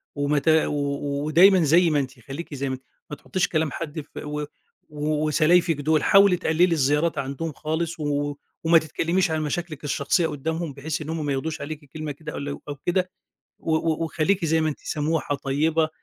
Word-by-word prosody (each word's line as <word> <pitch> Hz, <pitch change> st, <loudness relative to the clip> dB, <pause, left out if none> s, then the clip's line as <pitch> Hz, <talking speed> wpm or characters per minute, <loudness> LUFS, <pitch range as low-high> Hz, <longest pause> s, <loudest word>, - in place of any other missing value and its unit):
وما 145 Hz, +1 st, +1 dB
ت 145 Hz, -, -13 dB
و 145 Hz, -2 st, +1 dB
ودايمًا 180 Hz, +5 st, +6 dB
زي 165 Hz, +3 st, +5 dB
ما 150 Hz, -2 st, +2 dB
أنتِ، 130 Hz, -2 st, -5 dB
خلّيكِ 150 Hz, +3 st, -8 dB
زي 140 Hz, -1 st, -2 dB
ما 130 Hz, -, -1 dB
أنتِ. 130 Hz, -, -16 dB, 0.3 s
ما 150 Hz, -, -5 dB
تحطّيش 180 Hz, +5 st, -1 dB
كلام 155 Hz, -2 st, 0 dB
حد 160 Hz, -1 st, -5 dB
ف -, -, -17 dB
و 150 Hz, 0 st, -4 dB, 0.4 s
وسلايفك 155 Hz, +3 st, +2 dB
دُول 155 Hz, +1 st, +2 dB
حاولي 195 Hz, -2 st, +6 dB
تقللي 160 Hz, +1 st, +3 dB
الزيارات 155 Hz, -1 st, +1 dB
عندهم 140 Hz, +4 st, -3 dB
خالص، 160 Hz, +3 st, -3 dB
و 145 Hz, -1 st, -1 dB, 0.3 s
وما 165 Hz, +1 st, +6 dB
تتكلميش 165 Hz, +3 st, 0 dB
عن 160 Hz, -1 st, 0 dB
مشاكلِك 155 Hz, 0 st, -4 dB
الشخصية 145 Hz, +4 st, +1 dB
قُدّامهم، 160 Hz, +1 st, -3 dB
بحيث 150 Hz, +3 st, -4 dB
إن 150 Hz, -, -6 dB
هُم 160 Hz, -2 st, -2 dB
ما 145 Hz, -, 0 dB
ياخدوش 155 Hz, +4 st, -3 dB
عليكِ 150 Hz, +1 st, -6 dB
كلمة 155 Hz, -1 st, -5 dB
كده 150 Hz, +2 st, -8 dB
أو -, -, -5 dB
لو 140 Hz, 0 st, -5 dB
أو 145 Hz, -, -4 dB
كده. 180 Hz, +6 st, -1 dB, 0.5 s
و 160 Hz, -, -1 dB
و 160 Hz, 0 st, 0 dB
وخليكِ 165 Hz, +3 st, 0 dB
زي 160 Hz, 0 st, +2 dB
ما 155 Hz, -, +1 dB
أنتِ 150 Hz, -, -4 dB
سموحة 155 Hz, 0 st, -1 dB
طيبة. 155 Hz, +4 st, +1 dB
155 Hz, 190 wpm, -24 LUFS, 145-165 Hz, 0.5 s, ودايمًا